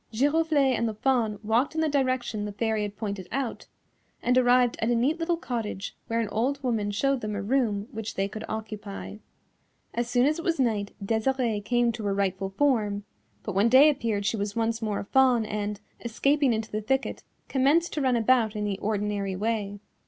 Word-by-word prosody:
Giroflée 290 +2 +2
and 235 - 0
the 215 - -6
Fawn 230 -3 +1
walked 235 +8 +1
in 320 - +1
the 320 - +2
direction 255 -7 0
the 210 - -4
Fairy 220 +1 -1
had 205 -1 -4
pointed 200 -4 -4
out, 265 -1 -3 0.6
and 250 - +2
arrived 245 -1 +4
at 225 - 0
a 240 - +3
neat 275 +8 +1
little 335 +1 0
cottage 225 - -4
where 230 0 0
an 225 - 0
old 265 +7 -1
woman 225 -5 0
showed 270 +6 0
them 210 -1 -3
a 200 - -2
room 215 -3 0
which 225 -1 -5
they 195 0 0
could 215 +2 -7
occupy. 215 -2 -6 0.8
As 240 0 -2
soon 245 +1 +3
as 305 +3 +1
it - - -5
was 335 -3 0
night 215 -5 0
Desirée 225 -1 0
came 240 +1 +2
to 220 -2 -6
her 200 -1 0
rightful 195 -1 -1
form, 210 -3 +1 0.4
but 210 - -4
when 200 +5 +3
day 275 +5 +7
appeared 225 -7 -2
she 220 - 0
was 205 0 -3
once 230 0 0
more 215 -2 -1
a - - -4
Fawn 250 -1 +3
and, 210 -1 -3 0.2
escaping 275 +4 +2
into 220 -1 -2
the 215 - -2
thicket, 265 +5 -1 0.3
commenced 285 +6 +2
to 300 - -1
run 260 -2 +2
about 230 -1 +3
in 210 - -2
the 200 -2 -2
ordinary 205 -2 -1
way. 205 0 -2
225 Hz, 200 wpm, -27 LUFS, 210-260 Hz, 0.8 s, day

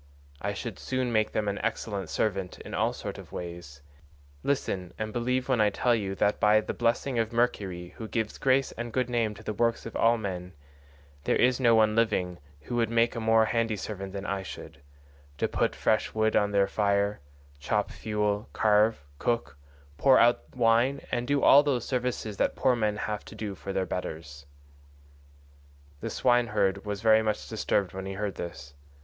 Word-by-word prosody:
I 100 0 -2
should 110 -2 -6
soon 130 -2 -2
make 110 -1 +1
them 105 - -1
an 100 0 -1
excellent 100 -5 -3
servant 95 -4 -1
in - - -9
all - - +1
sorts - - -6
of - - -12
ways. 85 -5 -8 0.6
Listen 95 - -2
and 110 0 -4
believe 125 +2 0
when 130 -4 +2
I 105 - +5
tell 120 +4 +1
you 100 -4 -1
that 105 +1 +1
by 105 +1 +5
the 110 - -4
blessing 120 +2 0
of 115 0 0
Mercury 100 -7 -1
who 110 - -6
gives 110 -1 -3
grace 135 0 +2
and 120 0 -6
good 125 0 -1
name 115 -3 0
to 110 - -13
the 110 - -3
works 115 +2 0
of 115 - -7
all 115 +1 +4
men, 90 -4 -5 0.7
there - - +2
is 125 +1 +3
no 120 -3 +5
one 110 -1 +4
living 90 -7 +1 0.2
who 95 - -5
would 115 -2 +2
make 115 0 +2
a - - -2
more 110 0 +4
handy 115 -1 0
servant 100 -1 -6
than 100 +1 -6
I 100 0 -2
should—to 70 -3 -8
put - - 0
fresh 110 - 0
wood 110 0 +2
on 105 - +3
the 100 -1 +3
fire, 100 0 +1 0.4
chop 105 +8 -1
fuel, 105 -1 -2
carve, 105 -4 +3 0.2
cook, 120 -10 -1 0.4
pour 130 -1 +6
out 120 +2 +3
wine, 120 +3 +3
and 120 0 -1
do 140 0 +1
all 140 - +8
those 135 -5 -1
services 125 -5 -2
that - - +1
poor 130 -2 +3
men 105 -3 0
have 105 0 -3
to - - -11
do 105 -2 -4
for 95 - -7
their 95 -1 0
betters." 75 -6 -6 1.5
The - - -4
swineherd 105 -6 +1
was 105 0 -4
very 110 -1 +6
much 110 -1 -2
disturbed 100 -4 0
when 95 0 -5
he 95 - -4
heard 100 0 -3
this. 80 -4 -7
110 Hz, 185 wpm, -28 LUFS, 95-115 Hz, 1.5 s, all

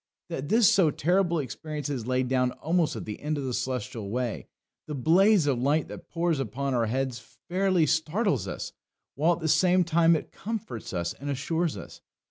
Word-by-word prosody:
That 140 +2 -4
this 225 -1 +5
so 185 -6 +4
terrible 175 +3 +1
experience 150 +2 -4
is 130 -5 -4
laid 130 0 +1
down 125 -1 +1
almost 165 0 0
at - - -6
the 105 - -7
end 150 +1 -2
of 140 - -3
the 130 -2 -3
Celestial 125 -5 -3
way 120 +1 -3 0.4
the 150 - -4
blaze 180 - +4
of 135 -4 +1
light 145 +5 +1
that - - -10
pours 170 -3 0
upon 135 +3 -2
our 120 -2 +1
heads 130 +1 -1
fairly 180 - 0
startles 165 +7 0
us, - - -5 0.4
while 160 +5 +3
at 170 - -6
the 160 - -1
same 180 +3 +4
time 170 0 +4
it 155 - -4
comforts 195 - -5
us 85 -2 -2
and 145 +2 -7
assures 160 +4 -1
us. - - -10
150 Hz, 190 wpm, -27 LUFS, 130-170 Hz, 0.4 s, this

